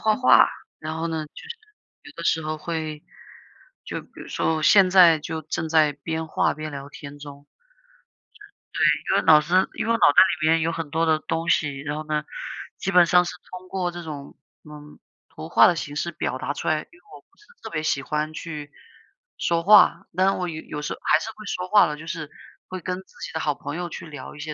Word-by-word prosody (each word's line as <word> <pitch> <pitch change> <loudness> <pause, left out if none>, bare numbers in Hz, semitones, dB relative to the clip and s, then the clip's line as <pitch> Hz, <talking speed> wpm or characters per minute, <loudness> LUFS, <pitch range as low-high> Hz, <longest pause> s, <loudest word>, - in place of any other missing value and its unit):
画 215 -1 +2
画。 255 - +6 0.3
然 155 +1 -5
后 165 +1 -2
呢， 160 -1 -3
就 - - -26
是 460 +1 -9 0.5
有 - - -13
的 170 - -6
时 160 - +1
候 155 0 -3
会 155 -2 -5 0.8
就 - - -5
比 - - -18
如 - - -10
说， 160 - 0
我 155 - -3
现 195 +2 +6
在 175 -4 +7
就 160 +1 -5
正 160 +1 -4
在 155 -2 +4
边 160 +3 -5
画 - - +1
边 155 +1 -7
聊 140 0 -8
天 145 0 -11
中。 145 0 -11 1.3
对， 150 0 +2
因 - - +4
为 - - -11
脑 155 -2 +7
子， 185 +4 +2
因 - - -3
为 - - +2
我 230 - +3
脑 - - +5
袋 - - +8 0.2
里 155 - +2
面 165 0 +3
有 165 +1 0
很 165 -2 -5
多 165 +2 0
的 155 -1 +2
东 165 +1 -3
西。 145 -5 +1
然 145 +1 -4
后 155 - -5
呢， 150 -1 -1 0.5
基 195 - -3
本 180 -2 +6
上 180 +1 +4
是 - - -4 0.2
通 185 0 -10
过 180 -2 -2
这 175 0 -8
种 145 -3 -8 0.3
嗯， 150 0 -13 0.3
图 160 - -9
画 - - +6
的 175 - +2
形 145 -2 -5
式 170 +3 -2
表 130 - -3
达 140 - -3
出 - - -6
来， 155 - +3
因 345 - -14
为 - - -33
我 - - -13
不 - - -37
是 420 - -22 0.2
特 - - -6
别 155 -2 -3
喜 140 -3 0
欢 150 +2 -2
去 150 -2 -7 0.7
说 170 -1 0
话。 210 +3 +6
但 185 +1 +3
是 195 - +3
我 180 -1 -2
有 160 -1 -6
有 150 - -6
时 - - -3
候 - - -11
还 155 - +4
是 220 - -6
会 215 -1 -13
说 180 -2 -4
话 210 -1 +6
的， 150 0 -5
就 160 - -10
是 155 -3 -5 0.4
会 185 0 -6
跟 180 +1 -4
自 - - -13 0.2
己 - - -8
的 160 - -2
好 150 -3 -1
朋 145 +1 -7
友 175 0 -4
去 - - -8
聊 145 -3 -9
一 - - -13
些 155 0 -5
160 Hz, 260 characters per minute, -24 LUFS, 150-175 Hz, 1.3 s, 袋